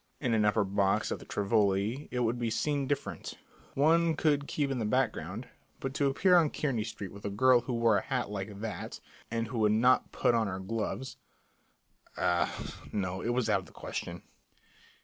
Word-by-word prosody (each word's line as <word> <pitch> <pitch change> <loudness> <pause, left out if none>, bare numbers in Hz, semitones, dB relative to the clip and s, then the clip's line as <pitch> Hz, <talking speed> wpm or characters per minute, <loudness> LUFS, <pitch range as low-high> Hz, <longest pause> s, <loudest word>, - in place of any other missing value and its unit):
In 125 -5 0
an 110 -1 +3
upper 105 0 +3
box 95 0 +1
at - - -2
the - - -12
Tivoli 105 +4 +1
it 125 - -2
would 120 +1 0
have 115 -2 0
been 145 -2 0
different 140 0 -3 0.4
one 165 +3 +4
could 145 -2 +1
keep 145 -2 -1
in 130 - -1
the - - -1
background; 110 -2 -1 0.3
but 135 0 -4
to 140 0 +1
appear 180 +7 +4
on 160 -3 +4
Kearney 130 -8 -1
Street 100 -3 -6
with 100 - -11
a 100 - -2
girl 125 +5 +4
who 125 +1 -4
wore 115 -2 +3
a - - -6
hat 125 -5 -2
like 100 0 -5
that 110 -2 -5 0.3
and 115 -1 -2
who 120 -2 -3
would 105 -1 +4
not 125 +4 +3
put - - +2
on 115 -2 +2
her 95 -1 -3
gloves 115 +6 -4 1.0
ah, 85 0 0 0.2
no, 95 -2 -2
it 115 - -2
was 120 -1 +1
out 105 -3 +3
of 95 - -12
the - - -18
question. - - -6
115 Hz, 195 wpm, -30 LUFS, 105-135 Hz, 1.0 s, one